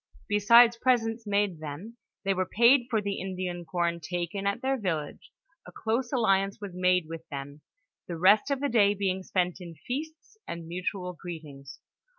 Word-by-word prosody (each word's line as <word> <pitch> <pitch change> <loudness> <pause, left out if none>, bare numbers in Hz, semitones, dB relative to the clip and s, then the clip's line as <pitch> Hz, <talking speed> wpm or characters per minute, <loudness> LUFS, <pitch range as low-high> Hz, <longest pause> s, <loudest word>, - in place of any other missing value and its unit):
Besides 230 +3 +6
presents 230 -2 +1
made 200 -4 0
them, 155 +10 -8 0.3
they 195 - +2
were 185 -1 -1
paid 240 +3 +5
for 220 -3 +1
the 200 -1 -2
Indian 180 -2 -4
com 170 -1 0
taken 175 +4 -3
at 200 +5 -1
their 270 +1 +1
village; 165 - -4 0.4
a - - -10
close 235 +3 -2
alliance 195 -6 +1
was 200 -3 -7
made 180 -1 +2
with 165 0 -9
them, 140 +1 -7 0.5
the 170 - -5
rest 200 - +5
of 280 -1 -1
the 285 - +1
day 205 -5 +3
being 190 -1 -1
spent 180 -1 -1
in 170 -2 -9
feasts 315 - -7
and 170 -1 -6
mutual 180 +1 -4
greetings. 150 -6 -10
195 Hz, 165 wpm, -28 LUFS, 175-225 Hz, 0.5 s, Besides